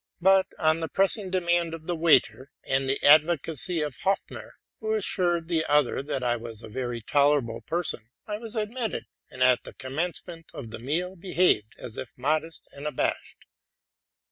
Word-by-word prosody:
But 190 Hz, +1 st, +5 dB
on 160 Hz, 0 st, +2 dB
the 165 Hz, -, -2 dB
pressing 195 Hz, +1 st, +1 dB
demand 175 Hz, -2 st, +1 dB
of 160 Hz, -1 st, -12 dB
the 175 Hz, -, -1 dB
waiter 160 Hz, -4 st, +3 dB
and 135 Hz, 0 st, 0 dB
the 135 Hz, -, +2 dB
advocacy 155 Hz, +2 st, +4 dB
of 150 Hz, -3 st, -3 dB
Hopfner, 195 Hz, 0 st, -2 dB, 0.3 s
who 220 Hz, -1 st, -1 dB
assured 175 Hz, -5 st, +1 dB
the 165 Hz, -2 st, +1 dB
other 145 Hz, -3 st, +2 dB
that 135 Hz, -2 st, -3 dB
I 120 Hz, -1 st, +1 dB
was 115 Hz, -1 st, -7 dB
a -, -, -9 dB
very 120 Hz, 0 st, -4 dB
tolerable 140 Hz, -4 st, +2 dB
person, 160 Hz, -9 st, -2 dB, 0.2 s
I 210 Hz, 0 st, -4 dB
was 230 Hz, 0 st, -7 dB
admitted, 225 Hz, +1 st, -2 dB, 0.2 s
and, 130 Hz, -, -1 dB
at 125 Hz, -1 st, +4 dB
the -, -, -10 dB
commencement 165 Hz, +4 st, -4 dB
of 115 Hz, -5 st, -7 dB
the 115 Hz, -, -6 dB
meal, 170 Hz, +9 st, -2 dB
behaved 175 Hz, -, +1 dB
as 115 Hz, -, -8 dB
if 120 Hz, -, -7 dB
modest 155 Hz, +5 st, -1 dB
and 140 Hz, +2 st, -6 dB
abashed. 150 Hz, -, -2 dB
160 Hz, 170 wpm, -27 LUFS, 130-180 Hz, 0.3 s, But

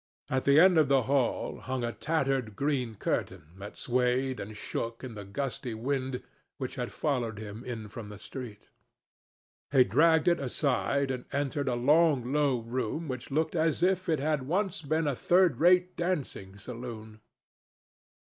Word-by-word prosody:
At 130 Hz, 0 st, 0 dB
the 140 Hz, +2 st, +6 dB
end 180 Hz, -1 st, +7 dB
of 155 Hz, -, +4 dB
the 135 Hz, -2 st, +3 dB
hall 135 Hz, -1 st, 0 dB
hung 130 Hz, -1 st, -3 dB
a 120 Hz, -, -1 dB
tattered 135 Hz, -8 st, -1 dB
green 130 Hz, -4 st, -1 dB
curtain 95 Hz, -, -2 dB, 0.2 s
that 100 Hz, +1 st, -9 dB
swayed 125 Hz, +1 st, 0 dB
and 105 Hz, +1 st, -7 dB
shook 115 Hz, +3 st, -4 dB
in 125 Hz, -3 st, -6 dB
the 105 Hz, -1 st, -7 dB
gusty 120 Hz, +3 st, -4 dB
wind 130 Hz, +2 st, -2 dB, 0.3 s
which -, -, -4 dB
had -, -, -4 dB
followed 120 Hz, -7 st, -1 dB
him 110 Hz, +2 st, -7 dB
in 115 Hz, -4 st, -6 dB
from 105 Hz, 0 st, -8 dB
the 105 Hz, -, -9 dB
street. 115 Hz, -1 st, -9 dB, 1.0 s
He 135 Hz, -2 st, +6 dB
dragged 160 Hz, +5 st, +4 dB
it 170 Hz, -1 st, +4 dB
aside 140 Hz, +1 st, 0 dB
and 125 Hz, -1 st, -4 dB
entered 140 Hz, 0 st, -1 dB
a 125 Hz, -, +1 dB
long 140 Hz, 0 st, +3 dB
low 140 Hz, -5 st, +2 dB
room 125 Hz, +7 st, -3 dB
which 130 Hz, -3 st, -5 dB
looked 155 Hz, +5 st, 0 dB
as 160 Hz, 0 st, +1 dB
if 185 Hz, 0 st, +2 dB
it 160 Hz, -3 st, +2 dB
had 145 Hz, -2 st, -1 dB
once 185 Hz, 0 st, 0 dB
been 155 Hz, +2 st, 0 dB
a 145 Hz, -, +1 dB
third 175 Hz, -3 st, +3 dB
rate 180 Hz, +2 st, +4 dB
dancing 140 Hz, -, -3 dB
saloon. 110 Hz, -1 st, -8 dB
130 Hz, 165 wpm, -29 LUFS, 120-155 Hz, 1.0 s, end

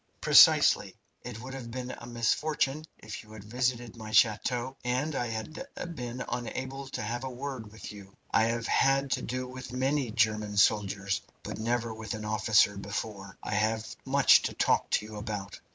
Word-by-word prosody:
"Precisely. -, -, +6 dB, 0.3 s
It 120 Hz, -2 st, -7 dB
would 130 Hz, +1 st, -8 dB
have 130 Hz, -3 st, -7 dB
been 125 Hz, +1 st, -5 dB
a 120 Hz, -, -9 dB
misfortune 135 Hz, +5 st, 0 dB
if 110 Hz, -1 st, -8 dB
you 110 Hz, 0 st, -15 dB
had 110 Hz, -2 st, -10 dB
visited 120 Hz, +1 st, -2 dB
my 110 Hz, -2 st, -8 dB
chateau 120 Hz, +4 st, +2 dB
and 130 Hz, +6 st, -1 dB
I 120 Hz, -3 st, -1 dB
had 115 Hz, -, -5 dB, 0.3 s
been 125 Hz, -3 st, -5 dB
unable 130 Hz, +3 st, -4 dB
to 135 Hz, -, -5 dB
have 120 Hz, +4 st, -3 dB
a 130 Hz, -, -3 dB
word 130 Hz, -4 st, -6 dB
with 110 Hz, -, -9 dB
you. 100 Hz, -2 st, -13 dB
I 110 Hz, -, +4 dB
have 115 Hz, 0 st, -1 dB
had 135 Hz, +1 st, +2 dB
to -, -, +1 dB
do 130 Hz, +1 st, -3 dB
with 130 Hz, -1 st, -8 dB
many 130 Hz, +1 st, 0 dB
German 105 Hz, -2 st, 0 dB
soldiers, 100 Hz, -1 st, +2 dB, 0.2 s
but -, -, -6 dB
never 115 Hz, 0 st, -1 dB
with 110 Hz, 0 st, -5 dB
an 110 Hz, 0 st, -6 dB
officer 105 Hz, -1 st, +3 dB
before. 100 Hz, -1 st, -5 dB
I -, -, -3 dB
have 110 Hz, +2 st, 0 dB
much -, -, +6 dB
to -, -, -3 dB
talk -, -, +2 dB
to -, -, +1 dB
you 110 Hz, 0 st, -9 dB
about." 105 Hz, -2 st, -5 dB
115 Hz, 180 wpm, -29 LUFS, 110-130 Hz, 0.3 s, Precisely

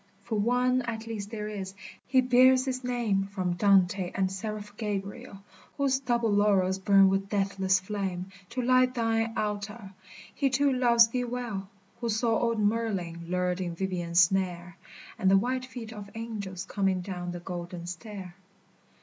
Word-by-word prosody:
[So] -, -, -23 dB
For 225 Hz, -, 0 dB
One 250 Hz, +3 st, +2 dB
at 230 Hz, -2 st, -5 dB
least 215 Hz, -3 st, -5 dB
there 210 Hz, -2 st, -5 dB
is, 195 Hz, -2 st, -6 dB, 0.2 s
— -, -, -24 dB
He 260 Hz, -1 st, +4 dB
bears 255 Hz, +1 st, +5 dB
his 255 Hz, -1 st, -3 dB
name 235 Hz, -6 st, 0 dB
From 185 Hz, -3 st, -2 dB
Dante 190 Hz, -1 st, +3 dB
and 190 Hz, -1 st, +1 dB
the -, -, -7 dB
seraph 210 Hz, +1 st, -6 dB
Gabriel, 200 Hz, -2 st, -5 dB
— -, -, -26 dB
Whose 275 Hz, -2 st, +2 dB
double 240 Hz, -4 st, 0 dB
laurels 195 Hz, -2 st, +3 dB
burn 195 Hz, 0 st, +6 dB
with 195 Hz, +1 st, 0 dB
deathless 195 Hz, -2 st, +1 dB
flame 190 Hz, -2 st, -4 dB, 0.2 s
To 250 Hz, +1 st, -3 dB
light 255 Hz, +1 st, +4 dB
thine 225 Hz, -1 st, +1 dB
altar; 210 Hz, 0 st, -3 dB, 0.4 s
He 275 Hz, -2 st, +1 dB
too 275 Hz, +1 st, +2 dB
loves 235 Hz, -2 st, +5 dB
thee 245 Hz, +1 st, -1 dB
well, 235 Hz, -6 st, -4 dB, 0.3 s
Who 235 Hz, -1 st, -2 dB
saw 225 Hz, +1 st, +1 dB
old 230 Hz, -1 st, +1 dB
Merlin 205 Hz, -6 st, -1 dB
lured 180 Hz, +1 st, -1 dB
in 175 Hz, -2 st, -3 dB
Vivien's 175 Hz, -2 st, +1 dB
snare, 175 Hz, -1 st, 0 dB, 0.4 s
And 190 Hz, -, +3 dB
the 195 Hz, -, +6 dB
white 255 Hz, +5 st, -1 dB
feet 230 Hz, -3 st, -8 dB
of 205 Hz, -2 st, -9 dB
angels 205 Hz, -5 st, -5 dB
coming 195 Hz, -2 st, 0 dB
down 180 Hz, -1 st, -5 dB
the 175 Hz, -, -6 dB
golden 175 Hz, -1 st, -6 dB
stair. 185 Hz, 0 st, -7 dB
205 Hz, 170 wpm, -28 LUFS, 190-235 Hz, 0.4 s, burn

